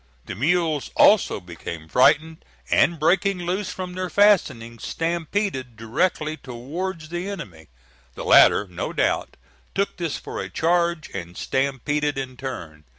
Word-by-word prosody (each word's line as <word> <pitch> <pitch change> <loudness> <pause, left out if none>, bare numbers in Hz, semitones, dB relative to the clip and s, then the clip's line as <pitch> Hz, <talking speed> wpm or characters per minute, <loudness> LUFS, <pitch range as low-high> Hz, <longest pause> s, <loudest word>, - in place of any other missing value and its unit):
The - - -5
mules 155 - 0
also 205 - +5
became 85 -2 -8
frightened, 155 - +3 0.3
and 170 - +4
breaking 185 +5 +2
loose 180 +3 -2
from 185 -1 -6
their 185 0 -3
fastenings 135 - +2
stampeded 165 - -2
directly 155 +7 -1
towards 155 +7 -6
the 175 +3 -4
enemy. 85 - -8 0.5
The - - -6
latter, 105 - +6
no 90 -2 -5
doubt, - - 0 0.4
took 200 +1 -1
this 170 -4 -2
for - - -6
a - - -6
charge, 170 -1 0
and 90 -2 -7
stampeded 140 +2 -1
in 130 -1 -4
turn. 85 - -7
155 Hz, 135 wpm, -23 LUFS, 120-175 Hz, 0.5 s, latter